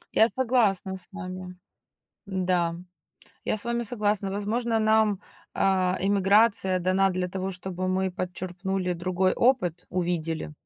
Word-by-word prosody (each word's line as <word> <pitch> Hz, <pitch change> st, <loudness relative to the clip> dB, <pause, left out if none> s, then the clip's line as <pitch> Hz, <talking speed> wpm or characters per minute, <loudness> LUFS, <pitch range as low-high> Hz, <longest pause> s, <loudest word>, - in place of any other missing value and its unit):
Я 225 Hz, -, +6 dB
согласна 225 Hz, -8 st, +1 dB
с 185 Hz, -, -11 dB
вами. 185 Hz, -1 st, -7 dB, 0.7 s
Да, 180 Hz, -3 st, 0 dB, 0.7 s
я -, -, 0 dB
с 205 Hz, -, 0 dB
вами 235 Hz, 0 st, -1 dB
согласна. 210 Hz, -3 st, 0 dB
Возможно, 225 Hz, +4 st, -1 dB
нам, 215 Hz, -2 st, +3 dB, 0.3 s
а, 185 Hz, -1 st, +2 dB
эмиграция 200 Hz, 0 st, +3 dB
дана 185 Hz, +2 st, +2 dB
для 180 Hz, 0 st, -2 dB
того, 190 Hz, +1 st, -3 dB
чтобы 185 Hz, 0 st, -4 dB
мы 185 Hz, 0 st, 0 dB
подчерпнули 185 Hz, +1 st, -3 dB
другой 185 Hz, +2 st, 0 dB
опыт, 180 Hz, -9 st, +1 dB
увидели. 170 Hz, -3 st, -2 dB
190 Hz, 125 wpm, -26 LUFS, 180-205 Hz, 0.7 s, Я